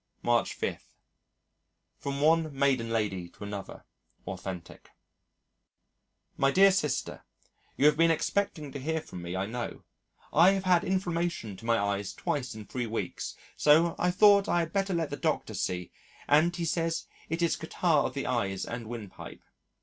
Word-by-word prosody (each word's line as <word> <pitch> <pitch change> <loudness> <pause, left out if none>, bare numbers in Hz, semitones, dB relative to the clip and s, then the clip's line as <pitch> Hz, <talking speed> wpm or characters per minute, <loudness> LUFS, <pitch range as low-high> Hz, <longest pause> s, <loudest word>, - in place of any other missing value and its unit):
March 120 0 +2
5. - - -3 1.2
From 140 0 -3
One 160 +1 +3
Maiden 135 -4 +2
Lady 100 -6 -1
to 105 - -12
Another. 100 -1 -7 0.4
(Authentic) 95 -2 -7 1.5
"My 135 - +3
dear 195 +6 +6
Sister, 150 -8 -1 0.5
You 140 - +3
have 150 0 +6
been 165 +1 +5
expecting 165 -2 -1
to 140 - -6
hear 160 +4 -1
from 90 - -9
me 85 +1 -5
I 95 +1 -1
know, 120 +3 -5 0.5
I 175 +5 +7
have 195 -1 -1
had 180 -2 +4
inflammation 175 - -1
to 115 - -12
my 115 0 +3
eyes 100 -1 -1
twice 130 -5 -2
in 110 -1 -8
3 120 +1 -3
weeks 115 +1 -4 0.2
so 160 +3 +4
I 180 - +2
thought 200 +2 +5
I 175 - +3
had 165 0 -4
better 195 -2 0
let 165 -3 -1
the 145 - -3
Doctor 155 -8 -1
see 90 -3 -3 0.4
and 160 +4 +4
he 170 -1 -2
says 165 0 -1 0.2
it 165 +2 -1
is 170 - +2
catarrh - - +1
of - - -9
the - - -2
eyes 95 -1 -1
and 115 -1 -6
windpipe. 110 -4 -8
145 Hz, 165 wpm, -29 LUFS, 110-170 Hz, 1.5 s, I